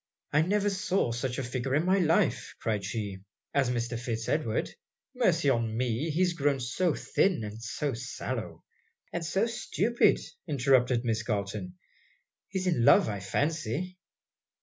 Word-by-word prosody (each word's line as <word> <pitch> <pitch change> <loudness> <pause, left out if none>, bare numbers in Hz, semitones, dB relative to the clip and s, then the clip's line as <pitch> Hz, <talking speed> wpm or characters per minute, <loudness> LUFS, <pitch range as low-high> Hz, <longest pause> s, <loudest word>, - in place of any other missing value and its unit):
'I 150 - +5
never 205 +1 +2
saw 190 -8 0
such 125 +2 -2
a 135 - -2
figure 130 +2 -2
in 155 +3 +2
my 190 +2 +3
life,' 165 -2 +1
cried 105 -3 -1
she, 100 -1 -4 0.3
'as 135 -3 +2
Mr. 120 -1 -2
Fitz 115 -2 -3
Edward. 130 -8 0 0.4
Mercy - - +2
on 115 -4 +1
me! 125 +5 0
he 165 +4 +2
is 180 -1 +2
grown 145 -4 +1
so 135 +7 0
thin, 185 - +1
and 105 +1 -7
so 130 +5 -2
sallow!' 120 +2 -5 0.5
'And 170 - -2
so 190 +6 +1
stupid,'interrupted 135 - +1
Miss 115 -1 +1
Galton. 100 -4 -3 0.7
'He 195 - -4
is 185 - -2
in 165 -10 +2
love 110 - +6
I 100 -2 -3
fancy.' 155 - -2
130 Hz, 150 wpm, -29 LUFS, 115-170 Hz, 0.7 s, love